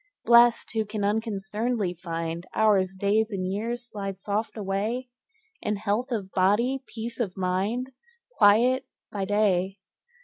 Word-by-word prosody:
Blest, 235 0 +5
who 220 -1 +1
can 210 0 -4
unconcern'dly 210 0 -1
find 165 0 -4
Hours, 195 -4 +3
days, 205 +3 +1
and 190 -3 -3
years, 230 +6 -3
slide 195 -4 -5
soft 210 +3 -2
away 215 +5 -2 0.5
In 210 - -1
health 215 +6 -1
of 200 -5 -3
body, 230 +8 +2
peace 230 +1 -6
of 200 -6 -2
mind, 195 +8 -1 0.5
Quiet 240 +5 +5 0.2
by 200 -2 -2
day. 195 -2 +1
210 Hz, 130 wpm, -26 LUFS, 195-230 Hz, 0.5 s, Blest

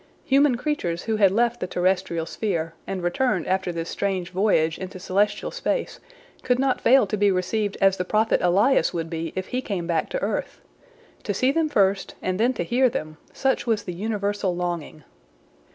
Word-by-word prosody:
Human 275 -2 +4
creatures 205 - -2
who 220 -1 -1
had 200 -2 +5
left 235 +4 +1
the 180 - -3
terrestrial 180 -2 0
sphere, 165 -3 -2
and 190 -2 -4
returned 180 0 0
after 190 -1 0
this 165 -1 -4
strange 190 -2 -2
voyage 180 -5 +1
into 185 0 -7
celestial 205 +3 0
space, - - -2 0.4
could 250 -1 +1
not 265 0 +1
fail 260 -1 +5
to 200 - -2
be 205 0 +3
received 195 +2 -1
as 195 0 +4
the 180 - -1
prophet 215 +4 +2
Elias 200 +10 +3
would 165 0 -3
be 165 0 -3
if 190 0 -4
he 255 - -1
came 195 -8 -3
back 165 -2 -1
to - - -3
earth. - - -3 0.6
To - - -3
see 255 +1 +2
them 320 +1 +1
first, 195 -7 +1
and 185 +1 -2
then 240 +3 +3
to 215 - -2
hear 250 +7 +3
them, 155 -7 -5
such 265 -2 0
was 225 -3 +1
the 180 - -5
universal 205 -1 -2
longing. 175 -4 -4
195 Hz, 185 wpm, -24 LUFS, 175-230 Hz, 0.6 s, had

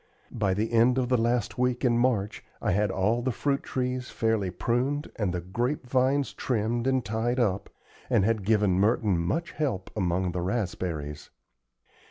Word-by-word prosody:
By 100 -5 0
the 110 +3 -1
end 120 +2 +4
of 125 -2 0
the 125 - +3
last 120 0 0
week 125 +1 +1
in 120 -1 +3
March 115 -4 0 0.2
I - - 0
had 105 +2 +2
all 105 +6 +1
the 130 +1 0
fruit 140 +4 0
trees 125 0 -3
fairly 110 -4 0
pruned 125 +9 -1
and 100 -5 -1
the 90 0 -3
grape 120 +11 -2
vines 130 +2 +1
trimmed 120 0 -1
and 130 -2 +1
tied 115 +3 -1
up, 100 -5 0 0.4
and 95 - +3
had 110 -2 +1
given 100 -3 +2
Merton 105 -3 +2
much 105 - -1
help 120 -12 -2
among 90 -2 0
the 90 0 -3
raspberries. 85 -7 -3
115 Hz, 170 wpm, -27 LUFS, 95-125 Hz, 0.4 s, end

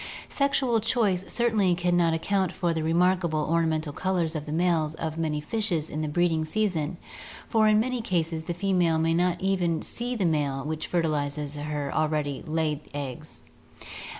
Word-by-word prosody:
Sexual 270 -4 +1
choice 210 -5 0
certainly 215 -7 +2
can 175 0 +1
not 170 -1 +3
account 190 +2 0
for 175 -2 -1
the 160 - -2
remarkable 170 0 +2
or 165 +2 +1
namental 155 -2 -1
colors 175 -2 0
of 150 -1 -4
the - - -4
males 160 -2 +1
of 160 -1 -4
many 155 -2 0
fishes 170 -1 -1
in 155 - -3
the 155 - -1
breeding 160 +1 +1
season, 175 -3 -1 0.5
for 220 -2 +3
in 215 0 +5
many 250 +1 -1
cases 165 -6 -1
the 175 - -3
female 175 -3 +2
may 165 +1 +2
not 175 +1 +1
even 180 -4 0
see 245 +1 -3
the 200 -5 0
male 145 -4 0
which 155 +1 -3
fertilizes 150 -3 -1
her 145 -1 -3
already 150 -3 -1
laid 155 -2 0 0.2
eggs. 145 +2 -6
165 Hz, 170 wpm, -27 LUFS, 155-185 Hz, 0.5 s, in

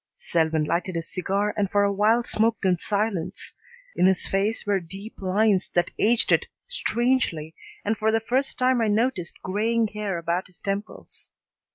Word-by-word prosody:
Selwyn 160 - 0
lighted 175 +4 -1
his 165 0 -3
cigar 200 +3 0
and 200 -2 0
for 205 0 +3
a 200 0 +2
while 220 +4 +3
smoked 225 -2 +1
in 185 -1 +4
silence. 200 -2 -2 0.4
In 180 - +4
his 190 -1 +2
face 200 +3 +1
were 200 -1 +2
deep 195 +6 -8
lines 195 0 +2
that 175 - +2
aged 230 +2 +4
it - - +3 0.2
strangely 240 - 0 0.3
and 220 +2 +1
for 220 0 +1
the 225 - +2
first 255 +5 +1
time 255 -1 +2
I 225 - +2
noticed 210 -4 0
graying 220 +4 0
hair 210 -3 -3
about 170 +2 -2
his 180 - -14
temples. 200 +2 -4
205 Hz, 170 wpm, -25 LUFS, 185-225 Hz, 0.4 s, in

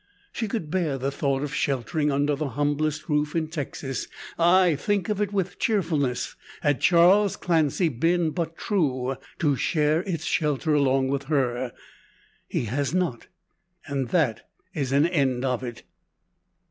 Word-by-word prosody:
She 225 - -3
could 200 -8 -4
bear 165 -7 0
the 135 +2 -2
thought 140 -1 -1
of 145 0 -4
sheltering 145 +2 0
under 145 +1 +1
the 150 0 -3
humblest 150 +1 0
roof 150 0 0
in 160 -2 0
Texas 140 -3 -4 0.3
ay, 175 0 +5
think 205 +7 -1
of 210 -1 0
it 205 -1 0
with 190 -3 -2
cheerfulness 160 - 0 0.3
had 145 -2 +1
Charles 180 +4 +5
Clancy 165 0 +1
been 165 +4 +1
but 165 0 -3
true, 135 - 0 0.2
to 145 -4 +2
share 150 +3 +1
its 175 -4 -4
shelter 150 0 0
along 135 -2 +2
with 140 0 -2
her. 130 -4 0 0.8
He - - -2
has 140 - -1
not, 175 -11 -1 0.6
and 135 -3 -2
that - - 0 0.2
is 135 -3 -2
an 140 +3 +4
end 135 -7 +1
of 125 -2 0
it. 120 -2 -7
150 Hz, 150 wpm, -25 LUFS, 135-170 Hz, 0.8 s, ay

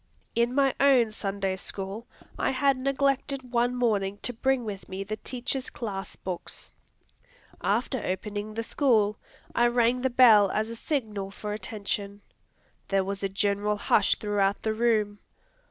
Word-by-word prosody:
In 235 +2 +1
my 275 -2 +3
own 260 -5 +5
Sunday 195 -2 -2
School, 195 +3 -6 0.3
I - - 0
had 275 +1 +3
neglected 275 -1 0
one 240 +1 +2
morning 205 -5 +1
to 245 - -2
bring 260 +1 +1
with 200 -3 -6
me 190 +1 -4
the 215 +2 -4
teacher's 255 +2 -4
class 200 -5 -5
books. 185 -2 -6 0.9
After 230 +4 0
opening 205 +3 -3
the 230 - -2
school, 220 -6 +2 0.4
I 240 - +4
rang 240 +1 +2
the 260 - +2
bell 225 -5 +7
as 220 +3 -1
a - - -5
signal 220 -8 -2
for 210 +1 -5
attention. 205 -1 -4 0.7
There 195 -1 +2
was 195 +1 -4
a 195 - -1
general 205 +1 0
hush 205 0 +3
throughout 200 -1 0
the 220 - +1
room. 215 -3 +1
215 Hz, 150 wpm, -27 LUFS, 200-250 Hz, 0.9 s, bell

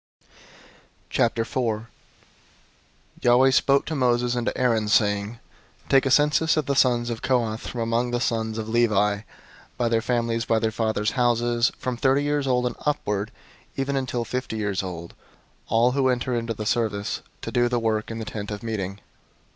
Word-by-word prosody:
004:001 115 -1 0 1.4
Yahweh 125 +2 +5
spoke 140 +1 +3
to 160 - -4
Moses 125 -3 +1
and 120 -1 -2
to - - -1
Aaron, 115 -4 +1
saying, 105 0 +2 0.5
004:002 - - -26
"Take 135 0 +4
a - - +1
census 150 +4 +3
of 155 - +1
the 140 - 0
sons 120 -2 +2
of 115 - -5
Kohath 115 -4 0
from 120 - -4
among 115 +2 0
the 120 0 -1
sons 110 -2 -1
of 110 -1 -4
Levi, 105 -3 +2 0.6
by 120 -1 +1
their 115 -1 +2
families, 115 -1 -1
by 115 - +2
their 110 0 0
fathers' 110 -1 0
houses, 120 -1 +2
004:003 - - -32
from 125 -2 -2
thirty 135 +3 +2
years 145 -1 0
old 125 -1 +2
and 120 - -2
upward 105 -8 -1 0.5
even 135 +1 -1
until 125 -3 -2
fifty 125 -1 -3
years 100 -3 -1
old, 85 -3 -7 0.5
all 115 +3 +3
who 130 0 +2
enter 125 0 0
into 115 -1 -2
the 110 - -5
service, 105 -3 -1 0.2
to - - -4
do 120 0 +2
the 120 - 0
work 110 -2 -1
in 115 - -5
the 110 - -5
Tent 105 -1 -6
of 105 0 -6
Meeting. 100 -4 -3
120 Hz, 180 wpm, -24 LUFS, 110-125 Hz, 1.4 s, Yahweh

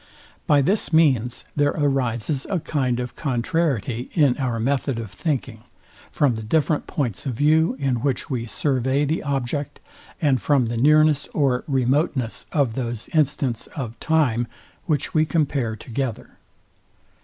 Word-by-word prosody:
By 145 -2 +4
this 200 +6 +1
means 130 -7 +2
there 145 0 +2
arises 135 -2 0
a 190 - 0
kind 130 -6 -1
of 125 0 -5
contrariety 130 - -1
in 145 -6 +4
our 125 -4 -1
method 135 +1 0
of 110 -4 -6
thinking, 130 - -3 0.5
from 140 -4 +2
the 110 - -5
different 150 +7 0
points 125 -5 -3
of 125 - -2
view, 155 +3 +3
in 135 -3 0
which 130 +2 -1
we 120 -4 -3
survey 135 +2 0
the 155 +3 -1
object, 140 0 -3 0.4
and 140 - +2
from 140 -4 +3
the 115 +1 -3
nearness 150 +2 +4
or 135 -4 +2
remoteness 130 -2 0
of 140 -7 +1
those 120 -2 -4
instants 140 -6 0
of 120 -6 -5
time, 130 -8 +1 0.4
which 150 -5 0
we 155 - +4
compare 140 -8 0
together. 120 +1 -4
135 Hz, 145 wpm, -23 LUFS, 120-150 Hz, 0.5 s, By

